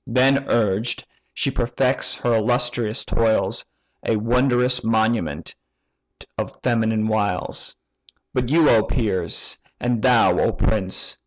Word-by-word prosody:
Then 135 Hz, +3 st, +2 dB
urged, 110 Hz, +1 st, 0 dB, 0.3 s
she -, -, -1 dB
perfects -, -, 0 dB
her 120 Hz, -, 0 dB
illustrious 120 Hz, 0 st, 0 dB
toils; 115 Hz, -1 st, 0 dB, 0.4 s
A 115 Hz, -, +1 dB
wondrous 125 Hz, +2 st, +1 dB
monument 110 Hz, -4 st, 0 dB, 0.9 s
of -, -, -5 dB
female 110 Hz, -3 st, +1 dB
wiles! 105 Hz, -4 st, -2 dB, 0.6 s
"But 125 Hz, -1 st, -1 dB
you, 160 Hz, +1 st, +4 dB
O 110 Hz, -, +5 dB
peers! 105 Hz, -5 st, -2 dB, 0.2 s
and 120 Hz, -2 st, -1 dB
thou, 125 Hz, -2 st, +4 dB
O -, -, +2 dB
prince! 95 Hz, -4 st, -2 dB
115 Hz, 110 wpm, -22 LUFS, 110-125 Hz, 0.9 s, O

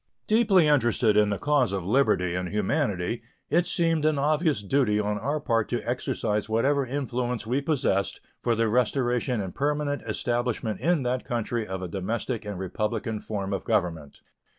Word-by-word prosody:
Deeply 215 Hz, -6 st, +4 dB
interested 120 Hz, -6 st, +3 dB
in 105 Hz, -1 st, +4 dB
the 100 Hz, -, -1 dB
cause 145 Hz, -5 st, +2 dB
of 95 Hz, -3 st, -3 dB
liberty 95 Hz, -6 st, +2 dB
and 90 Hz, 0 st, -2 dB
humanity, 105 Hz, -, -1 dB, 0.3 s
it 175 Hz, +2 st, +3 dB
seemed 165 Hz, -2 st, +1 dB
an 155 Hz, -1 st, +2 dB
obvious 150 Hz, -, +1 dB
duty 105 Hz, -2 st, +2 dB
on 105 Hz, 0 st, -1 dB
our 145 Hz, +7 st, -1 dB
part 115 Hz, -6 st, 0 dB
to 120 Hz, -1 st, -3 dB
exercise 120 Hz, -4 st, -1 dB
whatever 135 Hz, +6 st, +2 dB
influence 125 Hz, -3 st, -2 dB
we 125 Hz, +5 st, 0 dB
possessed 125 Hz, -, 0 dB, 0.2 s
for 120 Hz, -, +1 dB
the 115 Hz, 0 st, +2 dB
restoration 125 Hz, +1 st, +1 dB
and 95 Hz, -3 st, -4 dB
permanent 145 Hz, 0 st, -1 dB
establishment 120 Hz, -1 st, -1 dB
in 165 Hz, -4 st, +2 dB
that 125 Hz, +1 st, -1 dB
country 115 Hz, -1 st, -2 dB
of 95 Hz, 0 st, -4 dB
a -, -, -3 dB
domestic 110 Hz, +5 st, -3 dB
and 105 Hz, -2 st, -5 dB
republican 105 Hz, +4 st, -2 dB
form 100 Hz, -2 st, -4 dB
of 95 Hz, -, -2 dB
government. 80 Hz, -6 st, -1 dB
120 Hz, 165 wpm, -26 LUFS, 105-140 Hz, 0.3 s, Deeply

